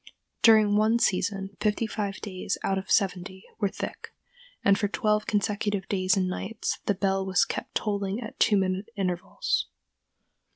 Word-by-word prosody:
During 215 -2 +6
one 220 +2 +4
season 195 -2 0
fifty 210 +2 +1
five 205 -3 -3
days 190 -1 -3
out 195 0 +1
of 190 - -10
seventy 190 -1 0 0.2
were 205 -3 +1
thick, - - -6 0.5
and 200 - +6
for 205 - 0
twelve 210 0 0
consecutive 205 -1 -1
days 185 -1 +1
and 185 -1 +1
nights 215 +4 -3
the 205 - +2
bell 195 0 0
was 190 -2 +2
kept - - -5
tolling 200 -1 -1
at 225 -3 -8
two 210 -2 +4
minute 190 +2 -1
intervals. 185 -3 -1
200 Hz, 155 wpm, -27 LUFS, 190-210 Hz, 0.5 s, During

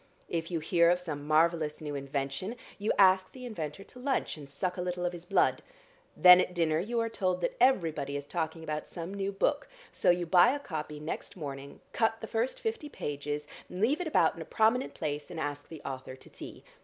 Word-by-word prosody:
If 165 -1 -2
you 170 -3 -2
hear 170 +1 +4
of 175 +1 +3
some 150 -5 -6
marvellous 155 0 +2
new 150 -2 -5
invention, 140 - -3 0.2
you 210 - +1
ask 185 -1 +5
the 255 -1 -9
inventor 170 -6 -5
to 250 - -13
lunch 270 +2 -1
and 145 -3 -11
suck 180 +6 -2
a - - -2
little 180 0 -2
of 175 - -1
his 175 0 -9
blood. 195 - +2 0.6
Then 180 0 +9
at 180 - -3
dinner 160 -2 +2
you 230 +7 -1
are 230 - +1
told 185 -5 -1
that - - -1
everybody 160 - +2
is 145 - -6
talking 160 +1 -3
about 155 -1 -4
some 170 +3 -6
new 200 0 -2
book, 285 +9 0 0.2
so - - +2
you 175 0 +3
buy 185 - +6
a - - -4
copy 150 - -5
next 155 +4 -5
morning, 140 -3 -7
cut 225 -1 +1
the - - -5
first 230 +3 -1
fifty 445 -10 -3
pages, 145 - -4 0.2
leave 225 - +1
it 355 - -2
about 315 - +3
in - - -8
a - - -6
prominent 225 +4 +2
place, 145 0 -3
and 165 - -6
ask 145 -1 -4
the 160 -3 -10
author 130 -1 -6
to - - -12
tea. - - -9
175 Hz, 215 wpm, -30 LUFS, 150-200 Hz, 0.6 s, Then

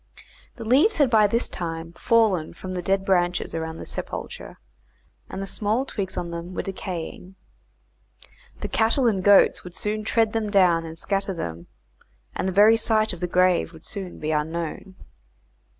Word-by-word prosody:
The 230 - -8
leaves 285 - +4
had 285 -5 +3
by 215 -2 +5
this 230 +4 0
time 165 -1 -5
fallen 215 -7 +2
from 185 -1 -7
the 180 - -3
dead 195 +2 0
branches 180 -2 +1
around 160 0 -4
the - - -8
sepulchre, - - -6 0.7
and 195 - -5
the - - -3
small 215 +6 0
twigs 195 -7 -4
on 170 -1 -3
them 170 +2 -6
were - - -2
decaying. 185 -1 -6 1.3
The - - -2
cattle 230 +4 +1
and 200 -5 +1
goats 205 0 +5
would 180 0 -10
soon 210 +2 -1
tread 225 0 +1
them 220 -2 -1
down 180 -5 +3
and 160 0 -8
scatter 195 +1 -2
them, 85 - -6 0.7
and - - -2
the - - 0
very 210 +4 +6
site 215 -2 +1
of 175 - -8
the 180 - -2
grave 180 -1 +2
would 160 0 -11
soon 195 -4 -6
be 155 +1 -3
unknown. 165 +5 -3
190 Hz, 170 wpm, -24 LUFS, 170-215 Hz, 1.3 s, very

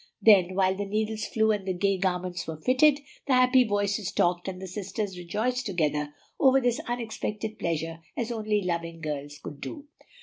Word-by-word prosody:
Then, 185 -4 +5
while 190 -1 +3
the 200 +1 -3
needles 215 +1 -1
flew 220 -1 +2
and 205 -2 -2
the 185 - 0
gay 195 0 +1
garments 180 -1 -2
were 160 -1 -4
fitted, 280 - +4 0.3
the 275 - +3
happy 255 0 +6
voices 205 -2 -1
talked 175 +1 +1
and 185 -1 -4
the 190 - -6
sisters 195 +1 -4
rejoiced 220 +8 -2
together 150 -5 0 0.3
over 270 -1 +6
this 245 -2 0
unexpected 220 -2 -4
pleasure 165 0 -2 0.2
as 235 0 -2
only 215 -3 0
loving 170 -2 -3
girls 145 -2 -5
could 145 -1 -9
do. 290 -2 -7
200 Hz, 175 wpm, -27 LUFS, 175-220 Hz, 0.3 s, happy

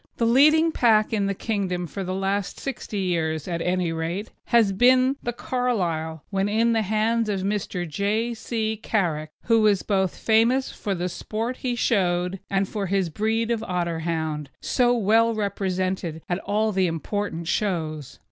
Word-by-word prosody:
The 230 - +1
leading 305 +7 +5
pack 220 -6 +3
in 205 -2 +1
the 200 - -1
Kingdom 185 -5 -2
for 185 +5 -5
the 185 0 -3
last 195 0 -2
sixty 255 -5 -5
years, 160 -4 -1
at 170 -2 -2
any 180 -1 0
rate, 165 +6 -3
has 230 -4 +4
been 255 +6 +4
the 240 - -2
Carlisle 175 - -2
when 195 0 0
in 230 +2 +2
the 225 - +2
hands 220 +2 +1
of 195 -2 -1
Mr. 195 -3 -2
J. 210 +8 -1
C. 220 -1 -2
Carrick, 170 -8 -1
who 225 -1 +3
was 210 -3 +3
famous 225 +6 +2
both - - -11
for 200 -2 -2
the 175 0 -2
sport 220 +7 -4
he 250 -2 -2
showed 180 -5 +1
and 195 0 +1
for 200 -1 -3
his 190 -3 0
breed 225 +5 0
of 230 -2 0
Otterhound, 165 -5 -2
so 245 -2 +2
well 225 +2 +3
represented 185 -5 -2
at 175 +1 -1
all 215 +2 0
the 190 -2 +2
important 170 +1 -3
shows. 160 -9 -2
200 Hz, 165 wpm, -24 LUFS, 175-225 Hz, -, leading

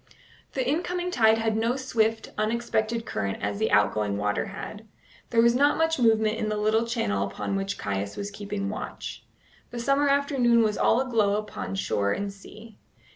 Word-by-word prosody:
The 260 -2 -1
incoming 355 +4 -1
tide 220 -6 +4
had 225 -1 0
no 230 +3 +1
swift, 225 -4 0
unexpected 225 +1 -1
current 100 -1 -2
as 100 0 -2
the - - +1
outgoing 105 0 +2
water 105 0 -1
had. 210 +2 -8 0.4
There 230 -1 +4
was 235 0 +5
not 285 +4 +3
much 325 -2 +1
movement 220 -2 +3
in 215 - -1
the 215 - -1
little 215 +2 +2
channel 100 - 0
upon 100 - -4
which 195 0 -2
Caius 100 0 -3
was 200 0 -4
keeping 200 0 -4
watch. 210 - -6 0.4
The 240 - -8
summer 275 +4 +2
afternoon 270 -5 +3
was 210 -1 +1
all 240 - +3
aglow 220 -6 +1
upon 210 -2 -4
shore 100 - 0
and 200 0 -3
sea. 215 +2 -14
220 Hz, 175 wpm, -26 LUFS, 200-235 Hz, 0.4 s, was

